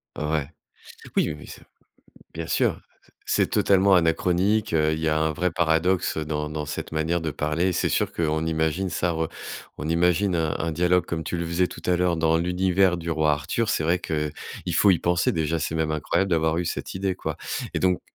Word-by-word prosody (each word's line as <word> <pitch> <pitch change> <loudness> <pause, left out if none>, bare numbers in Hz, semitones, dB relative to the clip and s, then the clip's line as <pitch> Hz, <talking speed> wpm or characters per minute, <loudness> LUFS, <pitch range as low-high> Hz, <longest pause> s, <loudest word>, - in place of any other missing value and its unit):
Ouais. 75 -1 -1 0.7
Oui - - +2
mais - - -12
c'est - - -11 0.7
bien 80 0 -4
sûr, - - +1 0.5
c'est - - +2
totalement 100 0 +4
anachronique, 90 +4 +2
heu, 80 0 +3
il 80 - -1
y 80 - 0
a 80 0 +2
un 80 0 +1
vrai 90 +3 0
paradoxe 85 +1 +1
dans 75 -1 -3
dans 75 -1 -4
cette 75 - -5
manière 80 +2 0
de 80 -2 -2
parler. 75 +5 0
C'est - - 0
sûr - - 0
qu'on 80 -1 0
imagine, 80 +4 0
ça 85 0 0
re 80 0 -1 0.5
on 75 - -4
imagine 90 +3 +2
un 80 -2 0
un 80 0 -2
dialogue, 90 +1 +2
comme 80 -1 -3
tu 85 - -3
le 85 0 -2
faisais 90 +2 +1
tout - - -10
à 90 -1 +3
l'heure, 90 -1 +1
dans 80 0 +2
l'univers 90 +1 +2
du 85 0 -4
roi 80 -2 +2
Arthur. 75 +10 -1
C'est 80 - 0
vrai 85 +2 +2
qu'il 75 -2 -2 0.4
faut 100 - +5
y 90 - +4
penser 85 0 +1
déjà. 80 0 0
C'est 80 - -2
même 80 -1 0
incroyable 95 +5 0
d'avoir 80 0 +2
eu 90 - -1
cette 85 - -4
idée, 95 0 -1
quoi - - -4 0.4
et - - +1
donc 90 -1 +2
80 Hz, 205 wpm, -25 LUFS, 80-90 Hz, 0.7 s, faut